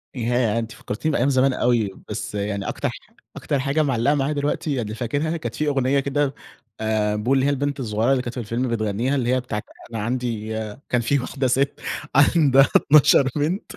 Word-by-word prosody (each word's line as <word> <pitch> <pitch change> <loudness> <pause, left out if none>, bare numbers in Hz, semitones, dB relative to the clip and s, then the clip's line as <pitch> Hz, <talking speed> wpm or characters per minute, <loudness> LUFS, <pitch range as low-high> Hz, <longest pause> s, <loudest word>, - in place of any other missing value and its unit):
ياه! 120 -2 +1
أنتِ 115 0 -5
فكرتيني 155 +10 -3
بأيام 130 +4 +2
زمان 130 0 +3
أوي، 120 -5 +1 0.2
بس - - -5
يعني 100 -1 -2
أكتر - - -2
ح - - -7 0.4
أكتر 140 - -2
حاجة 140 +3 +1
معلقة 135 +1 +1
معايا 140 +2 0
دلوقتي، 145 +1 -1
يعني 110 -4 -3
فاكرها، 145 +8 -2
كانت 160 - -5
في 150 - -1
أغنية 135 -1 +2
كده، 140 0 0 0.5
آآ، 110 -1 0
بو 115 +6 0
اللي 135 0 +3
هي - - +3
البنت 140 0 -1
الصغيرة 110 +1 0
اللي 130 -2 +2
كانت 120 - -5
في - - -5
الفيلم 115 +4 -2
بتغنيها، 115 +4 -1
اللي 125 -1 +1
هي 130 - +2
بتاعة 115 -4 -4 0.3
أنا 115 - -4
عندي 115 -3 -2 0.4
كان 125 -1 +2
في 140 +4 +1
واحدة 130 +1 -2
ست 135 +3 0 0.3
عندها 145 -2 +5
12 140 -2 +5
بنت. 165 +8 -2
130 Hz, 190 wpm, -22 LUFS, 115-140 Hz, 0.5 s, عندها